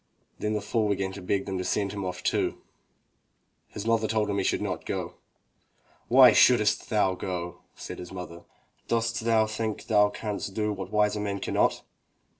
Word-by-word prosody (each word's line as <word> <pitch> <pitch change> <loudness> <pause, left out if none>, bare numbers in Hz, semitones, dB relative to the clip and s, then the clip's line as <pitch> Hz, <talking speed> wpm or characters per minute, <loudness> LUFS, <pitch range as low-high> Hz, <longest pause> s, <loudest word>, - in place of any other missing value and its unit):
Then 105 0 -1
the 105 - -1
fool 110 -1 0
began 95 -1 -1
to 95 +1 -9
beg 95 +2 -1
them 95 -1 -3
to - - -2
send 100 +1 -1
him 100 -1 -4
off 90 -1 -5
too. - - 0 1.1
His 105 - -7
mother 115 -1 +2
told 110 -2 0
him 100 - 0
he - - 0
should - - +1
not - - -3
go. - - -4 0.9
"Why 125 -1 +8
shouldst 110 -1 +4
thou 105 -4 +2
go?'* 90 -2 -5 0.2
said - - -8
his 90 - -8
mother. 90 -2 -8 0.5
"Dost 115 0 0
thou 110 -1 +3
think 110 0 -4
thou 105 -2 +4
canst 105 -2 -5
do 105 -1 0
what 95 -2 -6
wiser 105 0 +2
men 100 -1 -2
cannot?" - - 0
105 Hz, 180 wpm, -27 LUFS, 95-110 Hz, 1.1 s, Why